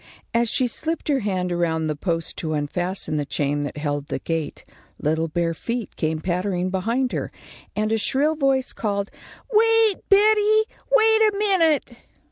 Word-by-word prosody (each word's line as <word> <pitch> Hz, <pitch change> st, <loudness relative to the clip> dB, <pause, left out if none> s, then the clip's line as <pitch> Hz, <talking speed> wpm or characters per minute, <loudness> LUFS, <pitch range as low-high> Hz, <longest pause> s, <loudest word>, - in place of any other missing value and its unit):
As 235 Hz, 0 st, +2 dB
she 255 Hz, -, +1 dB
slipped 315 Hz, +7 st, -3 dB
her 280 Hz, -2 st, +3 dB
hand 185 Hz, -4 st, -2 dB
around 165 Hz, -2 st, 0 dB
the 155 Hz, -1 st, -1 dB
post 165 Hz, +1 st, -3 dB
to 155 Hz, -2 st, -3 dB
unfasten 165 Hz, +2 st, -2 dB
the 145 Hz, -, 0 dB
chain 145 Hz, 0 st, -1 dB
that 145 Hz, +1 st, -5 dB
held 145 Hz, -1 st, -3 dB
the -, -, -2 dB
gate, 165 Hz, -3 st, -4 dB, 0.3 s
little 160 Hz, +2 st, 0 dB
bare 165 Hz, +1 st, -1 dB
feet 230 Hz, +6 st, -4 dB
came 155 Hz, -1 st, -1 dB
pattering 180 Hz, +1 st, -1 dB
behind 230 Hz, +7 st, 0 dB
her, -, -, -3 dB, 0.4 s
and 215 Hz, +1 st, 0 dB
a 225 Hz, -, +1 dB
shrill 285 Hz, +8 st, +2 dB
voice 270 Hz, -3 st, +1 dB
called: 200 Hz, -2 st, -2 dB, 0.4 s
"Wait, 450 Hz, -1 st, +4 dB
Betty, 425 Hz, +1 st, +5 dB, 0.3 s
wait 445 Hz, -2 st, +5 dB
a 425 Hz, -2 st, +4 dB
minute!" 340 Hz, -10 st, +2 dB
200 Hz, 160 wpm, -23 LUFS, -, 0.4 s, Betty